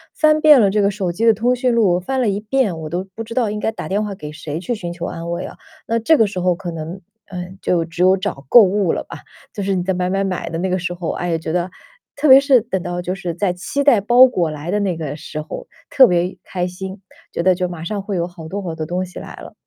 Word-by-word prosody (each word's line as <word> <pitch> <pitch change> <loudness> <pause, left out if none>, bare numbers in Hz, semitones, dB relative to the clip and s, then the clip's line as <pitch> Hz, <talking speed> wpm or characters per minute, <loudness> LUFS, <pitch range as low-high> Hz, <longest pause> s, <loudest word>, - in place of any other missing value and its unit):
翻 310 0 +3
遍 300 -4 +8
了 200 -3 +4
这 210 +1 +2
个 200 - +3
手 195 -3 -2
机 220 +7 0
的 225 - +7
通 240 +4 +1
讯 250 0 +1
录， 190 -6 +3
翻 260 +9 -2
了 250 - +1
一 200 0 0
遍， 210 -6 0
我 155 -1 -6
都 175 +3 -2
不 225 - -6
知 230 +1 -9
道 230 -5 +1
应 210 - -4
该 220 - -1
打 225 - -7
电 205 +3 0
话 200 -2 -4
给 150 -4 -8
谁 150 +1 -6
去 190 +7 -3
寻 175 -6 -5
求 170 0 -5
安 165 +1 -5
慰 170 +2 -3
了， - - -9 0.3
那 230 0 0
这 305 +8 +4
个 225 - +5
时 200 -3 -4
候 180 0 +2
可 175 -1 -6
能， 165 +3 -6 0.3
嗯， 180 0 -7
就 170 -2 +1
只 170 +2 -6
有 185 +1 +5
找 185 -9 -5
购 240 - +9
物 195 -2 +1
了 - - -2
吧。 - - -10 0.3
就 205 - -5
是 195 0 0
你 180 - -1
在 190 +1 0
买 180 0 -1
买 195 +1 0
买 185 -2 -3
的 165 - -4
那 185 +2 -1
个 185 - +1
时 180 0 -3
候， 175 -2 -3
哎 175 - -3
呀， 165 - +1
觉 160 0 -5
得 180 +1 0 0.5
特 285 +2 0
别 265 0 +10
是 275 -3 +4
等 190 -5 -3
到 175 0 -4
就 180 +1 -3
是 180 -3 -5
在 180 0 0
期 190 +10 -2
待 245 -8 +5
包 240 +5 +7
裹 180 -10 0
来 155 +3 -5
的 210 - +1
那 190 -4 -1
个 150 -3 -4
时 155 0 -7
候， 485 - -8 0.2
特 260 -2 +7
别 180 +1 0
开 180 -1 -3
心， 190 +2 -7 0.3
觉 170 - -2
得 185 +1 +5
就 180 0 -1
马 170 -2 -7
上 200 +4 -3
会 200 0 -4
有 170 0 -1
好 170 -3 -11
多 195 +5 -4
好 170 -3 -4
多 160 - -5
东 180 +1 -2
西 180 - -10
来 - - -9
了。 - - -11
185 Hz, 310 characters per minute, -19 LUFS, 175-215 Hz, 0.5 s, 别